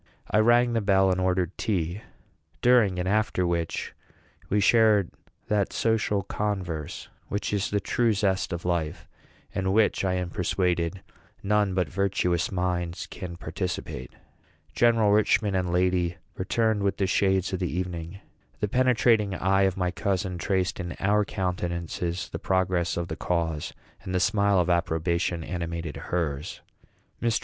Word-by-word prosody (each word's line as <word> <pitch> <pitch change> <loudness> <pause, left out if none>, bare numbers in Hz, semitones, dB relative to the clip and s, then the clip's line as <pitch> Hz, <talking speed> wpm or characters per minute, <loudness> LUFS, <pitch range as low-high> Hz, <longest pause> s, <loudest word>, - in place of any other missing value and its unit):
I 105 - +4
rang 120 +2 +4
the 115 - +1
bell 95 -2 +3
and 95 0 0
ordered 90 -1 0
tea, 90 -1 -1 0.6
during 120 -7 +4
and 90 0 -1
after 105 -2 +1
which 85 -1 -2 0.6
we 105 - +2
shared 105 -2 +4 0.4
that 105 -2 +1
social 110 -3 +1
converse 90 -7 -3 0.2
which 100 +1 -3
is 100 0 0
the 100 - +1
true 115 +4 +1
zest 95 -2 0
of 85 -1 -4
life, 85 -2 -2 0.5
and 95 -1 -1
in 95 - +2
which 110 -1 +3
I 95 -1 +1
am 90 -1 -3
persuaded 90 -1 -1 0.4
none 105 -2 +2
but 90 -3 +1
virtuous 90 -1 0
minds 90 -2 -2
can 85 -2 -8
participate. 85 -9 -5 0.6
General 115 -3 +4
Richman 105 0 +3
and 90 -2 0
lady 90 -1 +1 0.2
returned 110 +2 0
with 100 0 0
the 100 - +1
shades 95 0 +1
of 95 - -1
the 90 -3 -2
evening. 90 +1 -4 0.4
The 105 - 0
penetrating 115 -4 +3
eye 95 +2 +3
of 95 - -9
my 90 -1 0
cousin 95 -2 -2
traced 95 +1 0
in 85 -1 -4
our 105 +2 +3
countenances 90 -2 -3
the - - -6
progress 90 -3 0
of 85 0 -2
the 80 - -4
cause, 80 -3 -2 0.3
and 95 - -4
the - - +3
smile 100 0 +3
of 90 - +1
approbation 85 -1 0
animated 85 -2 -4
hers. 75 -5 -3 0.6
Mr. 115 -2 +1
95 Hz, 150 wpm, -26 LUFS, 85-100 Hz, 0.6 s, I